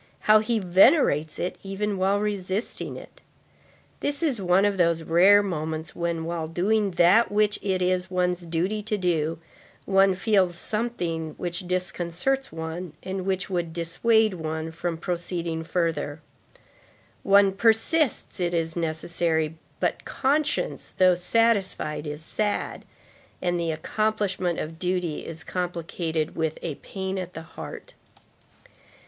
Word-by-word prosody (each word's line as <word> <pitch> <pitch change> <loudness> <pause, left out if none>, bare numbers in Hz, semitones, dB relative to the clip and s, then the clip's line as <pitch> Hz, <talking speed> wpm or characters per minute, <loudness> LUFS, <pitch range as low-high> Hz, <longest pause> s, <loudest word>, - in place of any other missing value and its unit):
How 215 0 +6
he 225 +2 0
venerates 180 - +4
it 180 - -3
even 200 +1 -2
while 195 +2 +2
resisting 205 0 -2
it! - - -13 0.8
This 285 +3 -2
is 265 -10 +1
one 185 +2 +3
of 205 -1 +1
those 170 -2 +2
rare 190 +6 +6
moments 160 -3 -4
when, 170 -1 -2
while 165 -1 -3
doing 200 +5 +1
that 185 +7 +5
which 210 0 +2
it 190 -2 0
is 180 0 0
one's 180 -1 0
duty 175 +5 -1
to 210 0 -2
do, 165 -4 0 0.5
one 195 -1 +4
feels 190 -3 +2
something 175 -7 -2
which 175 +1 -4
disconcerts 180 +8 -1
one, 160 +1 -5
and 190 0 -4
which 190 -1 -1
would 175 -3 -2
dissuade 215 +6 +2
one 160 -1 -4
from 170 0 -3
proceeding 170 -1 -3
further; 160 -3 -1 1.0
one 200 0 +5
persists, 225 +8 +2
it 175 -1 0
is 165 -1 -1
necessary, 160 -1 0 0.2
but - - -1
conscience, 295 +3 -1
though 185 -1 +6
satisfied, 190 -5 +1
is 150 +2 -6
sad, 210 +2 -2 0.5
and 175 -1 0
the 170 -1 -1
accomplishment 190 0 -1
of 160 +1 -5
duty 180 -3 -1
is 165 -1 -7
complicated 170 -2 -3
with 160 -1 -1
a 165 - -2
pain 190 0 -4
at 180 -1 -6
the 160 - -6
heart. - - -9
180 Hz, 130 wpm, -25 LUFS, 165-200 Hz, 1.0 s, How